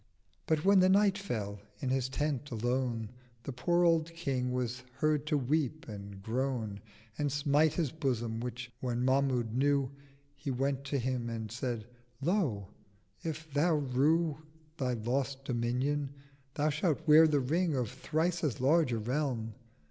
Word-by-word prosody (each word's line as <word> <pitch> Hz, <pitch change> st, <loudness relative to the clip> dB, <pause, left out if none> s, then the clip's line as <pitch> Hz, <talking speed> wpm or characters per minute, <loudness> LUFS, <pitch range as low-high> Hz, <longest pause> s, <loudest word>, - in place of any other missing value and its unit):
But 160 Hz, 0 st, +1 dB
when 200 Hz, 0 st, +6 dB
the 185 Hz, 0 st, +5 dB
Night 200 Hz, 0 st, +5 dB
fell, 110 Hz, -, -4 dB, 0.2 s
in 135 Hz, -, -2 dB
his 130 Hz, -1 st, 0 dB
Tent 145 Hz, 0 st, -2 dB
alone 120 Hz, -1 st, -1 dB, 0.3 s
The 140 Hz, -, -5 dB
poor 175 Hz, +8 st, +2 dB
old 165 Hz, -1 st, +3 dB
King 130 Hz, -7 st, -1 dB
was 125 Hz, -1 st, -2 dB
heard 150 Hz, +2 st, +1 dB
to 150 Hz, -, +2 dB
weep 150 Hz, +3 st, -1 dB
and 100 Hz, -2 st, -8 dB
groan 115 Hz, -3 st, -2 dB, 0.4 s
And 145 Hz, -1 st, +1 dB
smite 145 Hz, +2 st, +3 dB
his 160 Hz, -7 st, 0 dB
Bosom; 120 Hz, -7 st, -1 dB
which, 125 Hz, 0 st, -5 dB
when 125 Hz, -1 st, -1 dB
Mahmud 130 Hz, -4 st, +2 dB
knew, 140 Hz, 0 st, +2 dB, 0.4 s
He -, -, -5 dB
went 135 Hz, +1 st, -1 dB
to 140 Hz, 0 st, -1 dB
him 125 Hz, -2 st, -1 dB
and 110 Hz, -2 st, -5 dB
said 115 Hz, -1 st, -3 dB, 0.3 s
'Lo, 140 Hz, -, 0 dB, 0.5 s
if 160 Hz, -2 st, -5 dB
Thou 155 Hz, +3 st, +3 dB
rue 150 Hz, +3 st, +2 dB, 0.4 s
Thy 130 Hz, -4 st, 0 dB
lost 130 Hz, +4 st, -2 dB
Dominion, 130 Hz, +4 st, 0 dB, 0.5 s
Thou 150 Hz, +1 st, +2 dB
shalt 155 Hz, +1 st, 0 dB
wear 155 Hz, +1 st, +8 dB
the 150 Hz, -2 st, +2 dB
Ring 160 Hz, +5 st, +1 dB
Of 125 Hz, -4 st, -1 dB
thrice 170 Hz, +2 st, -1 dB
as 140 Hz, -8 st, 0 dB
large 150 Hz, +2 st, +3 dB
a 115 Hz, -, 0 dB
Realm.' 120 Hz, -1 st, -1 dB
135 Hz, 155 wpm, -32 LUFS, 120-155 Hz, 0.5 s, wear